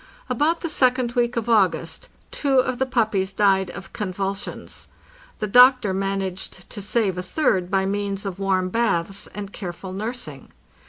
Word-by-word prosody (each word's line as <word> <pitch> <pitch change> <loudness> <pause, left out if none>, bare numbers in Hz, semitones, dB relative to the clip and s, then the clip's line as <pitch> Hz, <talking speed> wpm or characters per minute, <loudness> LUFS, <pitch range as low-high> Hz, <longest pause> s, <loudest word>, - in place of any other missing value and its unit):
About 325 +3 +1
the 335 - -2
second 255 -5 +2
week 240 -1 0
of 235 -1 -2
August 215 -5 +1 0.2
two 275 -2 +1
of 255 -1 +2
the 265 - +1
puppies 215 -6 +1
died 195 -2 +2
of 190 - -9
convulsions. 195 0 -4 0.5
The - - -2
doctor 245 -1 +6
managed 195 -1 -3
to 205 - -5
save 200 -2 0
a - - -3
third 185 - +1
by 190 0 +1
means 200 0 -2
of 195 -1 -5
warm 190 -2 +1
baths 195 -3 -1
and 205 -1 -6
careful 185 -1 -6
nursing. 205 - -6
200 Hz, 155 wpm, -23 LUFS, 190-240 Hz, 0.5 s, doctor